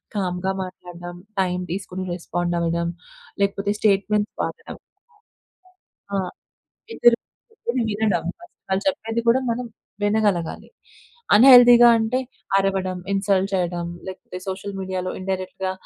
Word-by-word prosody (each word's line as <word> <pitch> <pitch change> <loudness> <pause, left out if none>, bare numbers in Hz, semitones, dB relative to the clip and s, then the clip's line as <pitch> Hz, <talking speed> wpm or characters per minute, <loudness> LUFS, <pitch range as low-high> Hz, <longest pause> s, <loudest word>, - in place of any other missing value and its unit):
కామ్‌గా 185 -1 -1
మాట్లాడడం, 175 -1 -9 0.3
టైమ్ 180 -1 -1
తీసుకొని 185 0 -4
రెస్పాండ్ 175 0 -2
అవ్వడం 170 0 0 0.5
లేకపోతే 200 0 +1
స్టేట్‌మెంట్ 210 0 +2
వాడడం. - - -6 1.4
ఆ! - - +1 0.7
ఇద్దరు 240 - +5 0.3
కూర్చుని 255 - -3
వినడం. 205 -5 0 0.4
వాళ్ళు 190 +1 0
చెప్పేది 235 -5 -2
కూడా 245 +3 +5
మనం 240 +2 -2 0.4
వినగలగాలి. 205 -5 0 0.7
అన్‌హెల్దీగా 245 0 +9
అంటే 225 +3 0 0.4
అరవడం, 190 -2 0
ఇన్‌సల్ట్ 195 -1 +1
చేయడం 175 -2 -1 0.2
లేకపోతే 185 -1 -8
సోషల్ 195 +1 -5
మీడియాలో 185 -1 -3
ఇన్‌డైరెక్ట్‌గా 185 0 -3
190 Hz, 100 wpm, -23 LUFS, 180-215 Hz, 1.4 s, అన్‌హెల్దీగా